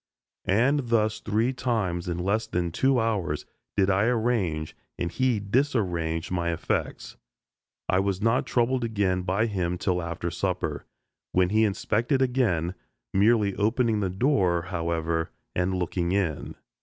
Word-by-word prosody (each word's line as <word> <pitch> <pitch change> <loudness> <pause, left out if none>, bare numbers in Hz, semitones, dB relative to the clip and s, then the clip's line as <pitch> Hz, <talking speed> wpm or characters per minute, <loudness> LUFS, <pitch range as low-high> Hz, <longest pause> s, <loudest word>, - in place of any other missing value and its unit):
And 125 +6 +2
thus 110 -1 +2
three 110 +5 0
times 100 -9 -1
in 85 - -2
less 100 +5 0
than 90 -4 -1
two 130 +8 +2
hours 100 -9 -1 0.3
did 95 -1 +4
I 95 +3 +3
arrange 110 -10 0 0.2
and 85 - -2
he 125 -1 +1
disarrange 95 - 0
my 85 -1 0
effects. 85 - -3 0.7
I 90 - +2
was 95 -1 0
not 115 +4 +1
troubled 125 +1 +1
again 100 -5 0
by 95 +4 +1
him 90 -5 -1
till 90 0 0
after 85 0 -4
supper, 90 -4 -2 0.5
when 90 -1 +3
he 110 +2 +4
inspected 110 +5 0
again, 115 -10 +1 0.4
merely 105 0 +3
opening 110 +1 +2
the 95 -2 0
door, 95 - +2
however, 85 -1 -1 0.3
and 90 +1 +1
looking 90 0 -1
in. 95 -7 -1
100 Hz, 140 wpm, -26 LUFS, 90-115 Hz, 0.7 s, did